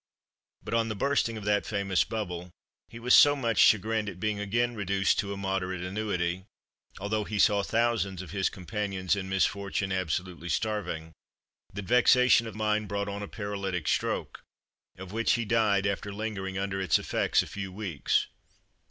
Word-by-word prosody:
But, - - -6
on 115 -1 +2
the 110 - -3
bursting 115 -1 0
of 105 - -7
that 105 0 +2
famous 100 -3 +1
bubble, 90 -5 -5 0.4
he 115 - -10
was 120 +2 +1
so 145 0 +8
much 115 -7 -1
chagrined 110 0 +4
at 90 -2 -10
being 105 0 -1
again 120 +4 0
reduced 100 -2 +1
to 100 - -2
a 100 - -4
moderate 95 -2 -2
annuity 90 -2 -2 0.5
(although 105 +2 -1
he 105 +1 -4
saw 105 0 +4
thousands 110 -4 0
of 90 - -10
his 95 -1 0
companions 95 0 -2
in 95 -1 -5
misfortune 100 0 0
absolutely 90 -1 -3
starving), 85 -5 -2 0.6
that 100 +1 -6
vexation 125 +1 +5
of 110 - -8
mind 105 -1 0
brought 100 +1 -2
on 100 0 -5
a 105 - -5
paralytic 100 -6 -4
stroke, - - -1 0.5
of 95 0 -9
which 115 +1 +1
he 120 -1 0
died, 105 -3 +2
after 100 0 -2
lingering 100 -2 -4
under 95 0 -2
its 90 -6 +3
effects - - +1
a - - -8
few 95 -2 -6
weeks. 90 -7 0
100 Hz, 170 wpm, -28 LUFS, 95-110 Hz, 0.6 s, so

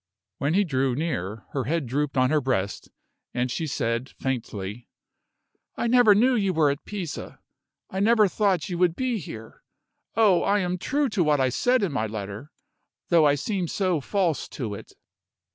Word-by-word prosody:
When 145 +5 0
he 205 - +4
drew 135 -6 0
near, 115 - -3
her 135 -4 -2
head 160 +2 -1
drooped 140 +3 -2
on 130 +1 +3
her 155 -1 +3
breast, 100 -7 -2 0.5
and 125 0 0
she 160 +5 -2
said, 120 -2 -2
faintly: 115 -4 -5 0.9
"I - - -2
never 235 -3 +6
knew 250 +5 +4
you 200 -5 +1
were 150 -3 +4
at 140 - -6
Pisa; 185 -8 -6 0.5
I 190 - -4
never 215 +1 +5
thought 195 -1 +1
you 175 -2 -4
would 175 -2 +3
be 250 -1 -1
here. 110 - -10 0.5
Oh, 205 -5 +4
I 200 +1 +2
am 180 -2 -1
true 285 +8 0
to 200 -5 +1
what 150 -2 +2
I 130 -1 +3
said 245 - +2
in 190 - 0
my 110 -6 -1
letter, 105 +5 -7 0.6
though 165 -3 +5
I 145 - +4
seem 185 +4 -2
so 185 -3 0
false 180 -1 0
to 115 -7 -5
it!" 100 - -10
155 Hz, 180 wpm, -25 LUFS, 130-195 Hz, 0.9 s, never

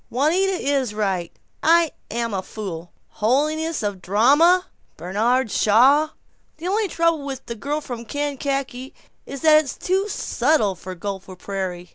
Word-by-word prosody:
"Juanita 335 +10 +2
is 275 - -1
right. 190 -5 -1 0.3
I'm 330 0 +4 0.4
a 190 - -1
fool. 180 -4 -7 0.2
Holiness 305 +7 0
of 205 -1 0
the 190 - -17
drama! 285 - +4 0.3
Bernard 225 +6 0
Shaw! 270 +9 +4 0.5
The 330 +3 -6
only 415 +2 +1
trouble 335 -4 +1
with 270 -2 -6
'The 235 - -5
Girl 290 +6 -2
from 240 -4 -7
Kankakee' 275 -1 -3 0.3
is 275 - -7
that 310 -1 +6
it's 275 - -7
too 385 +3 0
subtle 250 - +1
for 185 +1 -9
Gopher 190 0 -6
Prairie!" 180 -2 -5
265 Hz, 140 wpm, -22 LUFS, 205-310 Hz, 0.5 s, that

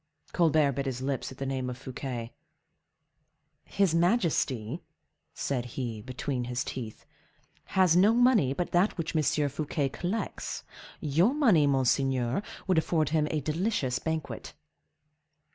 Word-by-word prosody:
Colbert 155 -4 +3
bit 135 +1 -3
his 130 -1 -3
lips 135 -1 -2
at 130 - -11
the 135 - -4
name 130 -1 -2
of 125 - -5
Fouquet. 125 -3 -6 1.3
"His 195 -5 +1
majesty," 165 - +1 0.5
said 125 -3 -2
he, 115 -5 -3
between 130 +1 -3
his 125 0 -2
teeth, 115 -4 -7 0.6
"has 185 -3 +3
no 195 +5 +6
money 240 - +4
but 175 +6 -2
that 180 +4 +2
which 165 -1 -3
M. 155 - +4 0.3
Fouquet 145 0 -2
collects: 180 +10 -4 0.4
your 170 - +2
money, 210 - +4
monseigneur, 130 0 +1 0.2
would 185 -4 +3
afford 160 -2 +1
him 155 -1 +1
a 155 - -1
delicious 155 - -1
banquet." 160 -2 -4
145 Hz, 130 wpm, -29 LUFS, 130-175 Hz, 1.3 s, no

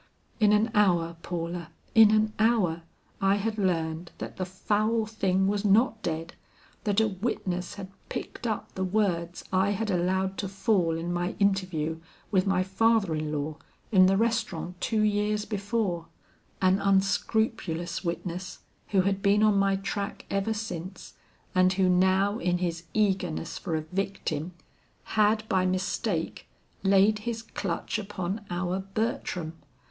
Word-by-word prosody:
In 210 -2 +5
an 215 +2 +3
hour, 175 -6 +3
Paula, 170 -1 -4 0.2
in 220 -2 +8
an 215 0 +3
hour, 215 -8 +2 0.4
I 195 0 +4
had 215 +1 -2
learned 165 -3 -1
that - - -7
the 185 -1 -2
foul 215 +4 0
thing 195 -3 +1
was 205 0 0
not 220 +2 +3
dead, 165 -1 -3 0.5
that 205 0 +2
a 220 - +4
witness 185 -3 -3
had 195 -2 -7 0.2
picked 240 - -5
up 215 -2 -3
the 190 - -2
words 180 -3 0
I 190 +1 +3
had 205 +1 -1
allowed 190 +2 0
to 195 - -2
fall 195 -4 +1
in 170 +2 -3
my 175 +1 -1
interview 185 -6 0 0.3
with 190 -1 +2
my 185 -1 +2
father 195 -1 +2
in 155 -1 -2
law 150 +1 -3 0.3
in 185 -3 +7
the 195 +1 +3
restaurant 215 -6 -1
two 220 -2 +1
years 210 0 +1
before; 200 -5 -2 0.6
an 185 +1 +4
unscrupulous 195 -3 0
witness 175 +1 -4 0.3
who 195 -2 +3
had 195 +1 0
been 205 +1 +4
on 215 -1 +5
my 195 0 +3
track 200 +1 -4
ever 200 +3 0
since, 190 -4 -6 0.4
and 185 0 +4
who 190 0 +2
now 190 +4 +3
in 180 0 +1
his 175 -1 -3
eagerness 190 -6 0
for 170 -5 -2
a 155 - 0
victim, 180 -1 -3 0.6
had 215 +1 +3
by 190 -4 +2
mistake 185 -1 -1 0.3
laid 200 +2 +4
his 230 +1 -4
clutch 195 0 -3
upon 200 0 -4
our 180 +1 -1
Bertram. 190 -5 -3
195 Hz, 145 wpm, -28 LUFS, 175-210 Hz, 0.6 s, in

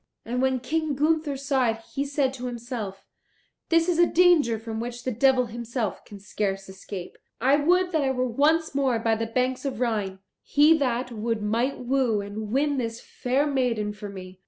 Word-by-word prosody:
And 250 +2 -1
when 260 -1 +1
King 310 +2 -1
Gunther 305 0 +1
saw 265 -3 +1
it, 225 0 -3
he 280 - -1
said 280 -2 0
to 250 -1 -5
himself, 235 -5 -6 0.6
"This 330 0 +3
is 345 -2 +1
a 345 - +6
danger 335 -10 +4
from 220 0 -5
which 240 +1 -5
the 255 - -1
devil 255 +2 +3
himself 235 -1 -4
can 205 - -11
scarce 195 -1 -3
escape. 190 -1 -8 0.2
I 265 +4 +4
would 360 +5 +2
that 320 -3 +1
I 270 - +1
were 255 -1 0
once 300 +7 +2
more 270 -4 +1
by 225 0 +1
the 225 +1 -1
banks 255 +2 -1
of 275 -5 -3
Rhine; 210 -6 -1 0.2
he 300 +3 +5
that 250 -2 -1
would 225 -1 -2
might 235 +6 0
woo 250 -3 +1
and 205 +1 -5
win 285 +2 +1
this 230 -2 -3
fair 260 +4 -1
maiden 245 -7 0
for 205 0 -8
me." 185 -1 -10
250 Hz, 190 wpm, -26 LUFS, 225-280 Hz, 0.6 s, a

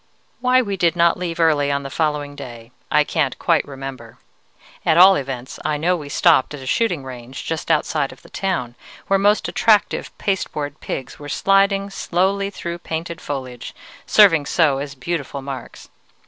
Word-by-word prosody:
"Why 255 +1 +3
we 200 -3 -3
did 170 -1 +2
not 170 -1 +4
leave 170 -2 -4
early 150 -4 +3
on 140 0 -1
the 135 - -7
following 150 -2 -1
day, 120 -4 -10 0.2
I 150 - +4
can't 150 -3 -1
quite - - +2
remember; 135 -4 -8 0.7
at 160 - +3
all 190 +2 +8
events, 130 -3 -5
I 150 -1 0
know 175 +5 +1
we 150 -4 -7
stopped 150 -2 +3
at - - -9
a 130 - -9
shooting 175 - 0
range 130 0 -8
just 165 0 -4
outside 150 -2 +1
of - - -16
the - - -16
town, 175 -12 -2 0.3
where 195 0 +2
most 205 +2 +3
attractive 215 -2 +2
pasteboard 150 -7 -3
pigs 130 -1 -6
were 145 0 -8
sliding 195 +3 +2
slowly 195 +2 0
through 170 -3 -6
painted 165 0 -5
foliage, 130 -4 -6 0.3
serving 165 -9 +5
so 150 -6 +2
as 140 0 -6
beautiful 140 -1 -4
marks. 135 -1 -8
155 Hz, 170 wpm, -20 LUFS, 135-180 Hz, 0.7 s, all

